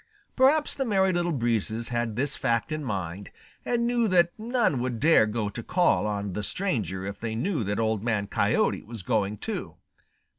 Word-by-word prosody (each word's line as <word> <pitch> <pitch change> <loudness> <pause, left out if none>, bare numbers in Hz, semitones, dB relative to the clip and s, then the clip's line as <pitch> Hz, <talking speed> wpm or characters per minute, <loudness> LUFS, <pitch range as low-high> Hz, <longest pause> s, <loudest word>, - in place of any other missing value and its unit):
Perhaps 285 +4 +4
the 270 - -2
Merry 190 -5 +2
Little 175 0 0
Breezes 115 -4 -1
had 120 -2 -1
this 140 +4 0
fact 115 +6 0
in 155 0 -3
mind, 95 -5 -4 0.3
and 235 -1 0
knew 240 -1 +2
that 175 -3 +4
none 225 - 0
would 120 -2 -2
dare 155 -6 +5
go 105 0 -2
to 105 - -6
call 175 - +2
on 100 -2 -3
the 105 - -3
stranger 105 - -2
if 100 0 -6
they 115 -1 -3
knew 155 - -1
that 105 +1 -2
Old 110 -2 0
Man 110 -4 0
Coyote 100 - +1
was 110 -3 -8
going 105 -1 0
too. - - -5
120 Hz, 185 wpm, -27 LUFS, 105-180 Hz, 0.3 s, dare